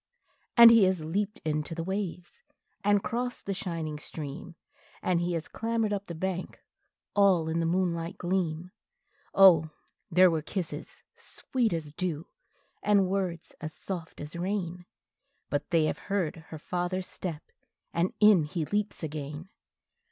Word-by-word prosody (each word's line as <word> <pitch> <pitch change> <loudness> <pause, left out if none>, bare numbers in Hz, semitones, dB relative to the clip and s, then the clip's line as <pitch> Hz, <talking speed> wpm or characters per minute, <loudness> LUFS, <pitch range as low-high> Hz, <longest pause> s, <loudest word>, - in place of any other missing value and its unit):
And 235 -1 +11
he 225 -4 +7
has 185 -4 0
leaped 200 +6 -2
into 155 +1 -1
the 165 - -3
waves, 185 -2 -4 0.4
and 205 0 +3
crossed 245 +1 -3
the 195 - -1
shining 165 -5 -4
stream, 150 +2 -7 0.5
And 175 -2 +2
he 175 0 0
has 165 -2 -3
clambered 225 -2 -1
up 200 0 -3
the 170 - -6
bank, 185 +2 -3 0.6
all 190 -5 +4
in 160 +1 0
the 165 - +1
moonlight 170 -1 0
gleam; 175 -1 -1 0.6
Oh 170 -5 +7 0.4
there 180 +1 +6
were 160 -1 0
kisses 175 +2 -5
sweet 245 -4 -2
as 160 -3 -3
dew, 170 -2 -3 0.6
and 200 -3 +3
words 185 -4 -2
as 155 0 -5
soft 175 -4 -6
as 150 +3 -7
rain, 180 -1 -3 0.6
But 145 0 -1
they 165 -3 +3
have - - -1
heard 165 -5 -1
her 160 - -7
father's 180 +3 -2
step, 165 -5 -6 0.4
and 170 +2 +1
in 210 -7 +6
he 155 +1 -3
leaps 205 +1 -2
again! 150 +2 -5
175 Hz, 145 wpm, -29 LUFS, 160-195 Hz, 0.6 s, And